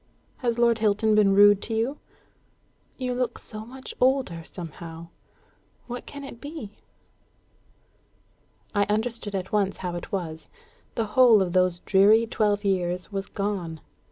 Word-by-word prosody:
Has 240 -2 -1
Lord 235 -1 +3
Hilton 215 0 +2
been 205 -2 +4
rude 205 0 +7
to 225 - -4
you? 240 +6 -1 1.0
You 250 -1 -2
look 250 0 -2
so 215 0 -7
much 260 +1 -9
older, 255 -11 +2
somehow. 165 -1 -9 0.8
What 245 0 -7
can 285 0 -8
it 240 -4 -10
be?" 285 -9 -8 1.9
I 205 -1 +2
understood 215 0 -1
at 190 -1 -4
once 200 -2 +1
how 180 -2 -4
it 175 - -7
was. 160 -5 -4 0.5
The 225 - 0
whole 245 -4 +7
of 180 -3 0
those 185 -1 +2
dreary 210 +4 +5
twelve 210 -2 0
years 180 -1 -1
was 195 -1 -3
gone. 190 -6 -3
205 Hz, 140 wpm, -25 LUFS, 185-235 Hz, 1.9 s, rude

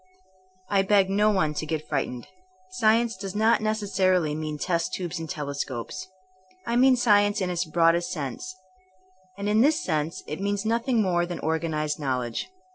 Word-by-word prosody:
I 200 -1 +3
beg 195 -1 +3
no 210 +2 +3
one 185 -7 +1
to 155 - -3
get 155 -1 -3
frightened. 125 -4 -2 0.5
Science 230 -1 +2
does 195 0 -7
not 220 +2 +3
necessarily 190 -6 +1
mean 155 0 -4
test 170 +2 -1
tubes 180 -1 -4
and 165 -1 -6
telescopes. 140 +4 -4 0.6
I 235 - -1
mean 255 +1 +6
science 205 -3 +3
in 185 -2 -1
its 175 0 -1
broadest 170 +2 +2
sense; 150 +3 -5 0.8
and 200 0 -3
in 210 +1 +3
this 300 +5 +4
sense 155 +2 -2
it 155 +5 -6
means 200 +1 -1
nothing 230 +1 +1
more 175 -2 +1
than 175 -1 -5
organ 160 0 -1
ized 150 0 -1
knowledge. 125 - -2
185 Hz, 165 wpm, -26 LUFS, 155-210 Hz, 0.8 s, mean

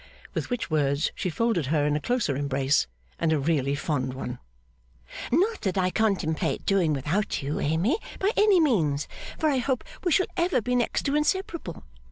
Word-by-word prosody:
With - - -3
which 245 -8 -3
words 140 -1 +1
she 185 - -2
folded 190 - 0
her 145 0 +2
in 150 0 +1
a - - +1
closer 230 - 0
embrace, 140 - +1 0.3
and 165 - +1
a 160 - +3
really 140 -2 +1
fond 130 -3 -2
one. 125 -2 -5 0.9
'Not 385 - +2
that 195 -2 -1
I 185 -1 +2
contemplate 195 -8 0
doing 190 -5 +2
without 150 +6 -1
You, 145 +2 -2
Amy, 175 - +1 0.2
by 395 +2 +1
any 415 -3 +5
means, 160 - +2 0.3
for 315 - +1
I 270 - +1
hope 255 0 -1 0.2
we 355 - +1
shall 370 - +4
ever 345 -5 +2
be 245 +2 -2
next 240 -1 0
to 280 - 0
inseparable. 310 - -1
180 Hz, 180 wpm, -26 LUFS, -, 0.9 s, any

